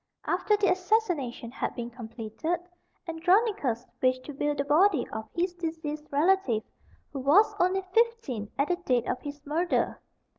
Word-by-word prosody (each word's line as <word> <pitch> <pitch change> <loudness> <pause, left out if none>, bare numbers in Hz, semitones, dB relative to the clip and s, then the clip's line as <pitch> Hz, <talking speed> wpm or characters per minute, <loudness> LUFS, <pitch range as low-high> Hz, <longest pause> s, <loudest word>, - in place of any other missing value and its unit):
After 370 +4 +2
the 405 - +3
assassination 360 - 0
had - - -3
been 240 -1 -5
completed, 230 +7 -4 0.5
Andronicus 335 - +1 0.2
wished 255 0 +2
to 295 - -7
view 295 +2 0
the 280 - 0
body 315 0 +4
of 220 0 -5
his 350 +1 0
deceased 320 -3 -5
relative, 290 - +2 0.5
who 275 - -3
was 335 +12 +5
only 375 +2 +2
fifteen 455 - +1
at 280 +4 +1
the 355 - +2
date 255 -9 0
of - - -2
his 290 -1 -8
murder. 330 +5 0
305 Hz, 150 wpm, -28 LUFS, 255-365 Hz, 0.5 s, was